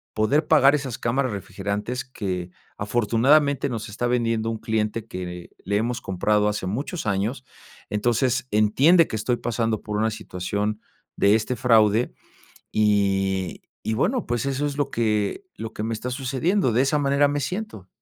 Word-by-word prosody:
poder 145 +9 +2
pagar 145 -2 +6
esas 135 -5 -3
cámaras 130 +2 0
refrigerantes, 105 +5 -4
que 95 -8 -4 0.3
afortunadamente 125 +7 +2
nos 115 -3 -4
está 110 +4 -2
vendiendo 115 -2 0
un 115 - -2
cliente, 110 0 -1
que 90 -3 -7
le 100 +2 -1
hemos 115 +3 -1
comprado 105 +3 +1
hace 105 -2 -3
muchos 140 - -3
años. 110 +6 -1 0.4
Entonces, 120 +4 +1
entiende 135 - +5
que - - -4
estoy 120 +3 0
pasando 115 -2 -1
por 105 -1 -4
una 110 +1 +2
situación, 105 0 -3 0.4
de 100 +1 +5
este 115 +3 -1
fraude. 115 -1 +3 0.6
Y 95 -3 +1 0.2
y 110 - -1
bueno, 220 - 0
pues, 120 +1 -1
eso 140 +1 -1
es 145 -1 -3
lo 145 - 0
que 105 - 0
lo 110 0 -6
que 105 - -5
me 115 +1 -2
está 120 +3 -4
sucediendo. 135 - 0
De 120 +4 +3
esa 135 +2 +2
manera 140 0 +3
me 145 +1 -1
siento. 180 - -5
115 Hz, 160 wpm, -24 LUFS, 105-130 Hz, 0.6 s, pagar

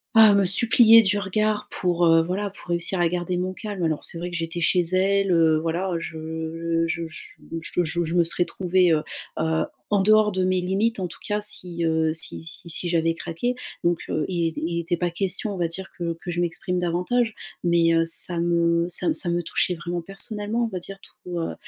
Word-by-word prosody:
ah 220 -2 +8
me 200 -1 +3
suppliait 225 +3 +7
du 205 +1 +1
regard 210 +2 -1
pour, 175 -1 +1
heu, 165 0 +6
voilà 195 +4 -2
pour 185 - -16
réussir 175 +2 0
à 170 - +3
garder 180 0 -2
mon 185 +1 -2
calme, 205 -3 -5
alors 155 -2 -1
c'est 170 - -3
vrai 175 +1 -4
que - - -5
j'étais 165 +1 -4
chez 180 +2 +3
elle, 190 +2 +1
heu, 160 -2 +4
voilà 170 +4 -2
je 160 +1 -3
je 165 0 -3
je 155 - -12 0.3
je 175 +2 -1
je 170 +1 -1
je 165 +2 -3
me 170 - +5
serais 175 +1 +1
trouvée, 180 -1 +2
heu 150 - +2 0.4
heu, 160 0 +1 0.3
en 205 -2 +3
dehors 215 0 +5
de 185 0 -1
mes 185 0 +1
limites 195 +4 0
en 180 - -2
tout - - -12
cas 210 -1 -1
si, 180 -5 -3
heu, 160 -1 +1
si 160 0 -7
si 165 +1 -8
si 175 +2 -3
j'avais 165 -1 +1
craqué. 205 +11 -3 0.3
Donc 170 -1 +2
heu, 155 - -1
il 170 -2 0
était 160 - -5
il - - -1
était 170 - -3
il 170 - -1
était 170 +1 -2
pas 175 0 0
question 195 +3 -1
on 190 - -6
va 170 -1 0
dire 190 +3 -7
que 170 -2 -2
que 175 - -6
je 175 - -1
m'exprime 175 +1 -2
davantage 180 +7 0 0.3
mais 170 -1 +3
heu, 165 - +4
ça 170 +1 +1
m 170 0 +2
ça 180 - 0
me - - +2
ça 175 - -3
me 175 0 0
touchait 180 - 0
vraiment 175 +1 -4
personnellement, 210 +4 -2
on - - -1
va 185 -5 -5
dire 195 +3 -9
tout, 175 -1 -8
heu 165 - -3
175 Hz, 230 wpm, -24 LUFS, 165-195 Hz, 0.4 s, ah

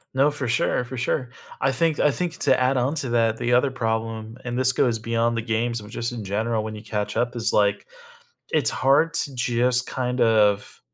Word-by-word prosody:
No, 140 +3 +3
for 145 -3 -3
sure, 120 +1 +1
for 130 +1 -7
sure. 125 +1 -1 0.3
I 135 - +2
think 155 +3 +1
I 150 - +4
think 170 +3 -3
to - - +4
add 130 +1 +2
on 130 +5 0
to 140 -5 -2
that, 115 -1 +1
the 120 0 0
other 130 +3 +4
problem, 115 -2 -3
and 120 -1 -4
this 130 0 +3
goes 120 -2 +1
beyond 115 +1 -1
the - - 0
games, 115 +1 -1
but 105 +1 -12
just 120 +1 -3
in 120 -3 -6
general, 110 +3 -1
when 110 - -5
you 105 - -8
catch 105 -2 -3
up 120 0 -1
is 115 -1 -1
like, 100 -1 +2 0.7
it's 145 -7 +3
hard 145 +5 +2
to 140 - -1
just 125 0 +1
kind 125 0 -3
of 105 -3 +2
120 Hz, 215 wpm, -23 LUFS, 115-130 Hz, 0.7 s, I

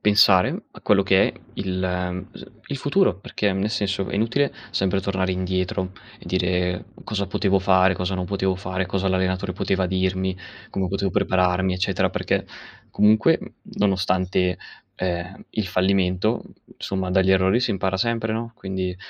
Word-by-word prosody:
pensare 100 -3 +4
a - - -14
quello 100 -1 +3
che 95 0 +4
è - - -6 0.2
il 90 -1 -2
s - - -11 0.2
il 140 - -4
futuro, 145 - +2
perché 100 0 -1
nel 95 +2 0
senso, 100 -1 -1
è - - -3
inutile 115 +7 +1 0.2
sempre 95 0 +1
tornare 95 -1 -1
indietro 95 0 -1 0.3
e - - -14
dire: 90 0 0 0.2
"Cosa 100 -2 -2
potevo 95 +1 +1
fare? 95 0 +4
Cosa 90 +1 -2
non 90 -1 -2
potevo 95 0 0
fare? 95 0 -3
Cosa 95 +1 -1
l'allenatore 95 0 0
poteva 95 +1 0
dirmi? 95 0 0 0.4
Come 95 -1 -1
potevo 95 +1 -1
prepararmi? 90 0 +2
Eccetera," 90 - +1
perché - - -1 0.4
comunque, 110 +1 +4
m - - -9 0.3
nonostante, 95 -2 +1 0.4
ehm, 90 +1 -4
il 110 -3 -2
fallimento, 95 +3 +1 0.3
insomma, 95 -1 -3
dagli 95 0 +4
errori 95 +4 +4
si 125 - +1
impara 95 -1 -1
sempre, 115 +2 0
no, 115 +1 -4
quindi 95 -3 -4
95 Hz, 155 wpm, -23 LUFS, 90-100 Hz, 0.4 s, pensare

